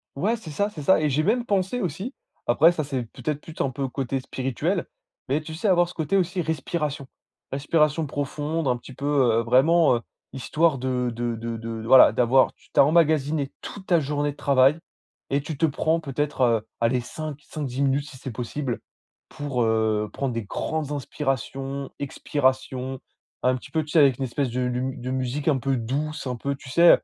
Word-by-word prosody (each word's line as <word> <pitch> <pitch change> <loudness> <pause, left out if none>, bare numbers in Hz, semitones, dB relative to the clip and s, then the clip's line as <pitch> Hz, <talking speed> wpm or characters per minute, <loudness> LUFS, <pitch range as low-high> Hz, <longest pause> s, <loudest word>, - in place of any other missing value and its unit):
Ouais, 205 +11 +1
c'est 195 -9 -10
ça, 200 +8 0
c'est 165 -7 -8
ça. 190 - +5
Et 150 -1 +1
j'ai 150 +3 +1
même 235 +5 +1
pensé 200 +4 0
aussi. 185 - -3 0.3
Après, 155 +8 +6
ça, 155 -3 -2
c'est 135 -3 -3
peut-être 150 -1 -3
plus 160 - -11
un 135 - +1
peu 135 +1 -3
côté 135 0 -2
spirituel, 130 -1 -2 0.4
mais 140 +3 +1
tu 155 +1 -8
sais 165 +7 -2
avoir 175 -2 +4
ce 180 - -10
côté 160 +4 0
aussi 180 0 0
respiration. 150 -2 -2 0.4
Respiration 150 +2 +1
profonde, 145 +2 -2
un 125 - +3
petit 125 +2 -12
peu, 140 - -6
heu, 130 -6 +3
vraiment, 135 +5 +5
heu, - - -7 0.3
histoire 150 +3 +1
de 125 -1 -1
de 120 0 -2
de 115 0 -4
de 115 0 -5
voilà 130 -2 +8
d'avoir, 125 +3 +3
tu - - -27
tu - - +2
as - - +9
emmagasiné 150 -3 +2
toute 190 -2 -8
ta 170 -3 +4
journée 145 0 -1
de 145 - -13
travail 135 +2 +4 0.5
et 140 +1 +1
tu 150 0 -6
te 165 - +3
prends 160 +3 +1
peut 140 -4 -7
être, 145 -2 -1
heu, 115 -3 +3
aller 120 +2 +2
5, 150 +4 -6
5-10 135 -3 -4
minutes 140 +2 +1
si 130 - -12
c'est 130 - -6
possible 125 +2 -3 0.5
pour, 140 -4 -3
heu, 110 -2 +1
prendre 135 -3 -2
des 115 - -2
grandes 150 +8 -3
inspirations, 135 -1 -3
expirations. 130 -2 -1 0.4
Un 130 0 +3
petit 125 - -9
peu, 160 -1 +1
tu 150 - -10
sais 165 - +5
avec 135 -4 +5
une 135 - -3
espèce 130 +1 -1
de 125 +2 -2
lum 125 +1 -2
de 125 +1 -4
musique 130 +3 -2
un 145 -4 +4
peu 135 0 0
douce, 140 +7 -3
un 125 - -2
peu 140 +4 -3
tu 135 -1 -13
sais, 170 +6 +6
140 Hz, 200 wpm, -25 LUFS, 130-155 Hz, 0.5 s, as